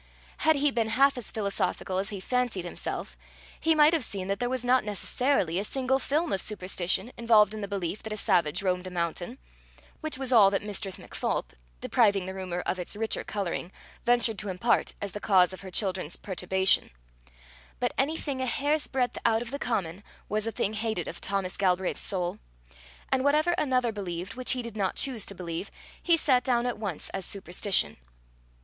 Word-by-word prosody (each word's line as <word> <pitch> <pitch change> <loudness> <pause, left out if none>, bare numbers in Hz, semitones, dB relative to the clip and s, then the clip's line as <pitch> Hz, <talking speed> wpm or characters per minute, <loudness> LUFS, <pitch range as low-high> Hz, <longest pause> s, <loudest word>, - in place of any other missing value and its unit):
Had 315 0 +4
he 290 0 +2
been 230 -3 0
half 275 +4 +4
as 245 -3 -5
philosophical 200 -2 -1
as 200 +2 -2
he 205 -3 -5
fancied 245 -4 -1
himself, 60 - -5 0.4
he 320 0 +3
might 305 +1 +6
have 320 -5 +1
seen 195 -4 -3
that 200 - -1
there 245 0 0
was 255 -1 -2
not 250 +1 +4
necessarily 210 - 0
a - - -1
single 265 +4 0
film 305 +5 0
of 195 - 0
superstition 190 +2 0
involved 220 -3 +5
in 215 - -5
the 200 - -3
belief 195 -1 -3
that 220 - -7
a 215 - -3
savage 175 -2 +2
roamed 180 -1 0
a - - -4
mountain 175 +6 -3 0.6
which 310 -4 -2
was 265 -1 -1
all 210 -5 +8
that 195 0 -1
Mistress 205 -2 -2
MacPholp, - - -3 0.3
depriving 200 -6 +3
the 190 - -5
rumour 185 -2 -4
of 185 - -2
its 180 - -3
richer 220 +1 -1
colouring, 185 -3 -3 0.3
ventured 235 -3 +3
to 210 - -3
impart 210 +6 +1
as 200 - -4
the 205 - -6
cause 190 -3 +4
of 185 - -9
her 190 - -8
children's 185 -4 0
perturbation; 190 0 +1 0.9
but - - 0
anything 280 -1 -1
a 260 - -1
hair's 290 +4 +1
breadth 255 -2 -1
out 225 0 +3
of 240 - -9
the 280 - -4
common, 200 -7 -2 0.2
was 215 +1 -1
a - - 0
thing 210 -1 -1
hated 220 0 -2
of - - -7
Thomas 195 -2 -2
Galbraith's 185 -1 +1
soul, 180 -3 -1 0.7
and 260 -1 +2
whatever 305 +4 +3
another 255 -7 +1
believed 185 -3 -5
which 255 +1 0
he 250 -1 -3
did 235 -2 -7
not 195 -3 -1
choose 255 -7 0
to 200 - -4
believe, 175 +1 -5 0.3
he 340 -2 +4
set 255 -5 +3
down 245 -2 +1
at 245 -3 -2
once 195 -8 -4
as 195 - -4
superstition. 185 - 0
210 Hz, 195 wpm, -28 LUFS, 190-250 Hz, 0.9 s, all